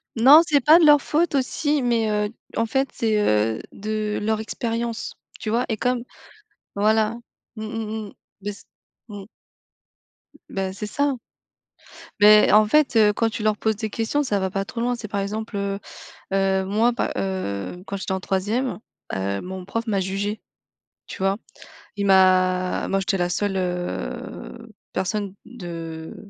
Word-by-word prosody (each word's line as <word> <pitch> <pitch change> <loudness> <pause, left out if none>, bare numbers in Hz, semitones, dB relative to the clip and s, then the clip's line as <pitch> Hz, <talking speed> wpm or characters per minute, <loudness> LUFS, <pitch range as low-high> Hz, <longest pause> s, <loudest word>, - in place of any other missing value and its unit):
Non, 275 +8 +8
c'est 290 -3 +3
pas 310 +6 +7
de 330 - +5
leur 295 -1 +7
faute 320 +1 +1
aussi, 285 +2 0
mais 235 -2 +1
heu, 210 0 0 0.3
en 230 - +1
fait, 270 +3 +1
c'est, 220 -2 +1
heu, 110 - +2
de 215 0 -3
leur 220 +1 0
expérience, 230 +1 -3 0.2
tu 215 - -4
vois, 235 +3 +1
et 220 - -1
comme 245 +1 0 0.7
Voilà. 215 +2 +2 0.4
Mmh 215 - -5
mh, 220 -1 -4
mmh. - - -14 0.3
Bah 205 - -3
s 200 - -12 0.4
mmh. 205 -2 -8 1.1
B - - -17
Bah, 190 -1 -3
c'est 210 +2 -5
ça 285 +4 0 1.0
beh, 210 +1 +7
en 215 0 +6
fait, 295 -1 +3
heu, 210 -2 +6
quand 225 +1 +1
tu 220 - -5
leur 215 -1 +2
poses 220 -1 0
des 220 +1 -4
questions, 225 +7 -1
ça 205 -6 0
va 190 0 -1
pas 195 0 -2
trop 230 +2 -7
loin. 245 +1 +1
C'est, 225 -3 -7
par 200 -1 -2
exemple, 210 +1 -4
heu 200 0 -2 0.5
heu, 190 -1 +2
moi, 220 +5 +2
pa 240 - -2
heu, 180 - -3
quand 200 - -4
j'étais 190 - -3
en 190 - -1
troisième, 210 +8 -1 0.4
heu, 100 +1 -2
mon 185 0 -6
prof 230 +4 -3
m'a 200 -3 +1
jugée. 200 +3 -2 0.7
Tu - - -8
vois? 195 +1 +2 0.6
Il 200 -1 -1
m'a 185 -1 +3
moi, 195 - +1
j'étais 195 0 0
la 175 -1 0
seule, 195 +2 -1
heu, 185 +5 -4 0.2
personne 200 0 -2
de 165 -7 -7
210 Hz, 170 wpm, -23 LUFS, 190-230 Hz, 1.1 s, Non